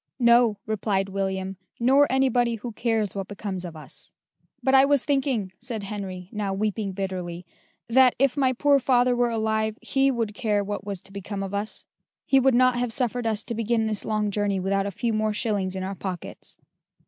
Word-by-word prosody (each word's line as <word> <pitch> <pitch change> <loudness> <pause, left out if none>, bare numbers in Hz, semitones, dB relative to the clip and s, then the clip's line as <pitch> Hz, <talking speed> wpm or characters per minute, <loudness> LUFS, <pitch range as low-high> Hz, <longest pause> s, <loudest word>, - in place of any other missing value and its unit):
"No," 235 -3 +5
replied 200 -2 -1
William, 190 -1 -2 0.2
"nor 270 +4 +4
anybody 245 -3 +2
who 235 +2 -6
cares 220 -2 0
what 195 -1 -4
becomes 200 -2 -5
of 170 -2 -7
us." 155 - -8 0.5
"But 265 - +2
I 265 0 +8
was 280 -2 +3
thinking," 265 -9 0
said 235 -3 -4
Henry, 195 -3 -6
now 205 -2 -2
weeping 210 -1 -1
bitterly, 180 -2 -4 0.4
"that, 255 +1 +5
if 275 0 +2
my 270 -3 +3
poor 285 +2 +4
father 250 -1 +3
were 240 0 +2
alive, 220 -1 0
he 270 0 +2
would 230 -5 -1
care 210 -2 0
what 205 0 -4
was 200 -3 -4
to - - -12
become 200 0 -5
of 195 0 -5
us: 205 +2 -3 0.4
he 270 - +4
would 265 -1 +4
not 255 0 +4
have 245 -1 -1
suffered 245 -1 -1
us 215 -1 0
to - - -4
begin 230 0 0
this 215 -2 -1
long 215 -1 0
journey 200 -1 0
without 195 +1 0
a - - -1
few 230 +3 -1
more 215 0 0
shillings 200 -3 -1
in 190 - -3
our 190 +1 -3
pockets." 185 -2 -6
215 Hz, 195 wpm, -25 LUFS, 195-245 Hz, 0.5 s, I